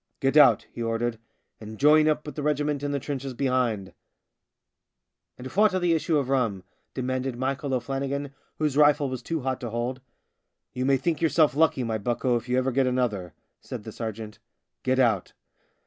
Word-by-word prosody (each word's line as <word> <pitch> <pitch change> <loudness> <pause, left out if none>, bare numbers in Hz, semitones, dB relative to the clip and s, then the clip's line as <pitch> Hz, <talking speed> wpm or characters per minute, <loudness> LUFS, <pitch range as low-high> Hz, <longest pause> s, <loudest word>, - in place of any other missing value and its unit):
" - - -49
Get 135 +1 +1
out," 135 -8 +6
he - - -7
ordered, 115 0 -1 0.2
" - - -47
and 110 0 -8
join 155 +3 +5
up 155 0 +1
with 150 - -6
the 150 - -5
regiment 145 -1 0
in 145 0 -2
the 140 - 0
trenches 135 -1 -5
behind." 120 -8 0 0.8
" - - -59
And 125 - -10
phwat 205 +6 +3
of 185 - -1
the 170 -1 +3
issue 160 0 +1
of 140 -3 0
rum? 115 -9 0 0.2
" - - -48
de 130 - -3
manded 130 0 -2
Michael 135 +2 -2
O'Flannigan, 135 +2 -3 0.2
whose 150 -3 0
rifle 145 -1 +4
was 130 -1 -4
too 160 +4 -3
hot 130 0 -2
to 120 - -4
hold. 120 +3 -3 0.4
" - - -56
You 125 0 -2
may 135 -1 +4
think 160 +5 -1
yourself 160 -3 +3
lucky, 150 -4 +2
my 110 -2 -2
bucko, 120 +3 0
if 120 +1 -4
you 125 - +2
ever 130 +1 +1
get 130 +1 +2
another," 115 -9 -1 0.2
said - - -8
the - - -8
sergeant. 110 -2 -6 0.2
" - - -58
Get 130 0 +1
out." 115 -8 +1
130 Hz, 210 wpm, -26 LUFS, 120-145 Hz, 0.8 s, out